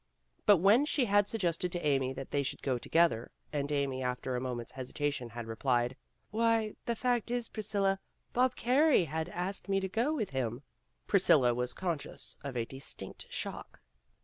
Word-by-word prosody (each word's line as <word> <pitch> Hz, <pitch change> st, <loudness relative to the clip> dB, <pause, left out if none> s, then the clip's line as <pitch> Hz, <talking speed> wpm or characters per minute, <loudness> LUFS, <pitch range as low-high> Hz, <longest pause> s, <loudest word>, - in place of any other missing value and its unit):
But 205 Hz, -, +8 dB
when 205 Hz, -, +5 dB
she 285 Hz, -4 st, +2 dB
had 205 Hz, -1 st, +3 dB
suggested 180 Hz, -4 st, -1 dB
to 175 Hz, -3 st, -3 dB
Amy 135 Hz, -3 st, +2 dB
that 135 Hz, 0 st, -7 dB
they 145 Hz, -, +2 dB
should 140 Hz, -, -4 dB
go 130 Hz, -3 st, 0 dB
together, 165 Hz, -6 st, +2 dB, 0.2 s
and 145 Hz, 0 st, -1 dB
Amy 140 Hz, -2 st, 0 dB
after 125 Hz, 0 st, -2 dB
a 125 Hz, -, -1 dB
moment's 125 Hz, -2 st, -4 dB
hesitation 135 Hz, 0 st, -3 dB
had 120 Hz, 0 st, -6 dB
re 115 Hz, 0 st, -5 dB
plied, 125 Hz, 0 st, +1 dB, 0.4 s
"Why, 225 Hz, -1 st, +2 dB
the 235 Hz, -, +1 dB
fact 240 Hz, -1 st, 0 dB
is, 240 Hz, -1 st, -2 dB
Priscilla, 200 Hz, -3 st, 0 dB, 0.3 s
Bob 255 Hz, +1 st, +3 dB
Carey 265 Hz, -, +4 dB
has 160 Hz, +2 st, -3 dB
asked 185 Hz, +3 st, -4 dB
me 195 Hz, 0 st, +3 dB
to 190 Hz, -, -2 dB
go 230 Hz, +9 st, 0 dB
with 220 Hz, -, -2 dB
him," 125 Hz, -1 st, -2 dB, 0.4 s
Priscilla 145 Hz, -11 st, +5 dB
was 125 Hz, +1 st, -2 dB
conscious 170 Hz, -6 st, -3 dB
of 135 Hz, -3 st, -4 dB
a 115 Hz, -, 0 dB
distinct 135 Hz, +3 st, -7 dB
shock. -, -, -6 dB
160 Hz, 175 wpm, -32 LUFS, 130-210 Hz, 0.4 s, But